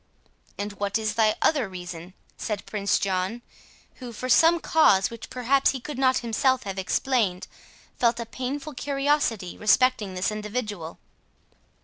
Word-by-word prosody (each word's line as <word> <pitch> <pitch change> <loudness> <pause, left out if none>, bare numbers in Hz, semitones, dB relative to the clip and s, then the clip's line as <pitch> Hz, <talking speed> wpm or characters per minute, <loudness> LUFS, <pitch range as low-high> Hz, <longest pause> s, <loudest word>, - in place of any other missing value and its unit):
"And 205 0 -4
what 200 +1 0
is 215 -1 -2
thy 215 -1 +3
other 275 -10 +2
reason?" 180 0 -8 0.2
said 210 -3 -4
Prince 200 -2 0
John, 195 +4 -2 0.5
who, 250 -2 -8
for 255 +3 -6
some 330 +7 +5
cause 210 -14 +3
which 230 -1 -9
perhaps 260 +2 +2
he 265 - -4
could 265 +2 -7
not 260 -1 +3
himself 260 +3 +1
have 195 -1 -5
explained, 195 -2 0 0.5
felt 235 -1 +2
a 235 - -3
painful 275 +5 -5
curiosity 275 -8 -1
respecting 215 -2 +3
this 185 +3 0
individual. 210 -5 -5
225 Hz, 140 wpm, -25 LUFS, 200-260 Hz, 0.5 s, some